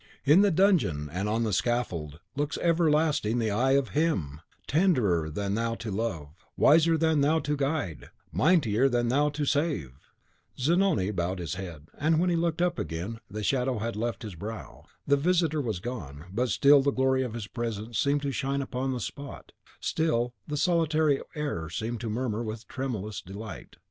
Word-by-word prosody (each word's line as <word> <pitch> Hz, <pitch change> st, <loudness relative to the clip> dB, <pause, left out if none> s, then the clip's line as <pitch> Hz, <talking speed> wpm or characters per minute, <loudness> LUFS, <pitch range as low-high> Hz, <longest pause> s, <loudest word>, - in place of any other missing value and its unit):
In 150 Hz, +7 st, +7 dB
the 205 Hz, -, +5 dB
dungeon 160 Hz, -, +2 dB
and 95 Hz, +5 st, -2 dB
on 115 Hz, +2 st, +1 dB
the 110 Hz, -3 st, -1 dB
scaffold 90 Hz, -10 st, -1 dB, 0.2 s
looks 145 Hz, +1 st, -1 dB
everlasting 155 Hz, -8 st, +2 dB
the 110 Hz, -3 st, 0 dB
Eye 130 Hz, +6 st, +2 dB
of 140 Hz, -2 st, +2 dB
HIM, 90 Hz, -, -1 dB, 0.2 s
tenderer 125 Hz, -, +2 dB
than 100 Hz, +5 st, -2 dB
thou 115 Hz, +1 st, -1 dB
to 115 Hz, -2 st, -6 dB
love, 85 Hz, -7 st, -4 dB
wiser 165 Hz, +2 st, +5 dB
than 160 Hz, -2 st, +2 dB
thou 150 Hz, +3 st, +3 dB
to 150 Hz, -, -1 dB
guide, 140 Hz, -, -2 dB, 0.2 s
mightier 130 Hz, -, +3 dB
than 120 Hz, -1 st, +1 dB
thou 145 Hz, +4 st, +3 dB
to 145 Hz, 0 st, -2 dB
save!" 145 Hz, -, 0 dB, 0.7 s
Zanoni 160 Hz, -, +2 dB
bowed 90 Hz, -1 st, -2 dB
his 85 Hz, -4 st, -4 dB
head; 85 Hz, -6 st, -7 dB
and 155 Hz, +2 st, +3 dB
when 180 Hz, +1 st, +2 dB
he -, -, +2 dB
looked 170 Hz, 0 st, 0 dB
up 175 Hz, -1 st, 0 dB
again, 85 Hz, +8 st, -4 dB
the 105 Hz, +2 st, -5 dB
last -, -, -3 dB
shadow 130 Hz, -2 st, +1 dB
had 115 Hz, +1 st, -3 dB
left 120 Hz, +3 st, -3 dB
his 105 Hz, -3 st, -6 dB
brow. 105 Hz, +7 st, -8 dB, 0.2 s
The 140 Hz, 0 st, +3 dB
visitor 165 Hz, -1 st, +2 dB
was 110 Hz, -8 st, -2 dB
gone; 80 Hz, -, -7 dB
but 125 Hz, +4 st, 0 dB
still 140 Hz, +2 st, +6 dB
the 140 Hz, -, +2 dB
glory 130 Hz, -1 st, +2 dB
of 125 Hz, -3 st, -3 dB
his 115 Hz, -3 st, -4 dB
presence 115 Hz, 0 st, -4 dB
seemed 145 Hz, -1 st, +1 dB
to 140 Hz, -, -1 dB
shine 140 Hz, +2 st, -1 dB
upon 130 Hz, 0 st, -2 dB
the 125 Hz, -, -3 dB
spot, 140 Hz, +4 st, -7 dB, 0.3 s
still 125 Hz, -7 st, 0 dB
the 150 Hz, -1 st, -3 dB
solitary 160 Hz, -3 st, +2 dB
air 145 Hz, -, -3 dB
seemed 115 Hz, +6 st, -4 dB
to 115 Hz, -, -3 dB
murmur 115 Hz, 0 st, -2 dB
with 110 Hz, 0 st, -6 dB
tremulous 110 Hz, -6 st, -4 dB
delight. 100 Hz, +1 st, -9 dB
125 Hz, 180 wpm, -28 LUFS, 105-150 Hz, 0.7 s, In